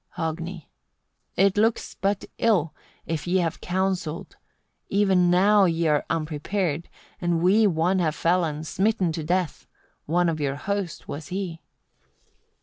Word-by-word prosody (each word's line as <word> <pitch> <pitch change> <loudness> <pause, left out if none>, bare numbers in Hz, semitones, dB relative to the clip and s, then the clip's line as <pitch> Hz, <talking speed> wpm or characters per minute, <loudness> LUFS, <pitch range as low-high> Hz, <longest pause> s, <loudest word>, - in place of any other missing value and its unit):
Hogni. 165 0 -4 0.7
41. 195 - +4
"It 200 0 +1
looks 225 +2 +1
but 200 0 -1
ill, 185 -9 +2 0.3
if 165 0 -3
ye 180 - +1
before 185 - +3
have 165 -1 -3
counselled: 180 -3 -2 0.6
e'en 190 -3 +3
now 195 +3 +5
ye 165 -1 +1
are 150 -2 +2
unprepared, 165 +1 -2 0.3
and 175 -1 +1
we 210 +4 +5
one 180 +1 +1
have 160 -4 0
felled, 165 -3 0
smitten 195 0 +1
to 160 0 -4
death: 175 0 -1 0.4
one 175 +3 +2
of 160 -2 -1
your 140 -2 -1
host 195 +2 -4
was 150 +2 -6
he." 180 -3 -4
175 Hz, 145 wpm, -25 LUFS, 160-190 Hz, 0.7 s, now